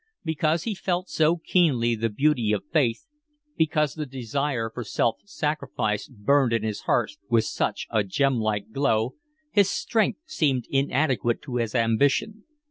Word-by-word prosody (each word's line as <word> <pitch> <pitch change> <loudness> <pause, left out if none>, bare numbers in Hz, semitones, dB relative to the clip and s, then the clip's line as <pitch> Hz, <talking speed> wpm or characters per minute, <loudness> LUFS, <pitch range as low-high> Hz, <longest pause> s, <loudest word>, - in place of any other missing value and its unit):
Because 160 0 0
he 225 - -2
felt 185 -1 -2
so 160 +2 +3
keenly 145 -9 +2
the 115 0 -1
beauty 125 -1 +1
of 105 - -1
faith, 145 - +1 0.5
because 150 -3 +1
the 155 -2 -5
desire 130 -1 -2
for 120 - -5
self 115 +1 0
sacrifice 150 - -2
burned 130 +2 +2
in 115 -2 +1
his 110 -2 -3
heart - - +2 0.2
with 115 -2 +3
such - - -2
a 110 -2 +2
gem 130 +6 +1
like 110 -1 -2
glow, 115 -3 +1 0.4
his 200 -2 +4
strength 220 0 0
seemed 145 - 0
inadequate 135 -4 +1
to 125 -4 -4
his 115 -1 -2
ambition. 140 - +1
135 Hz, 150 wpm, -25 LUFS, 115-155 Hz, 0.5 s, his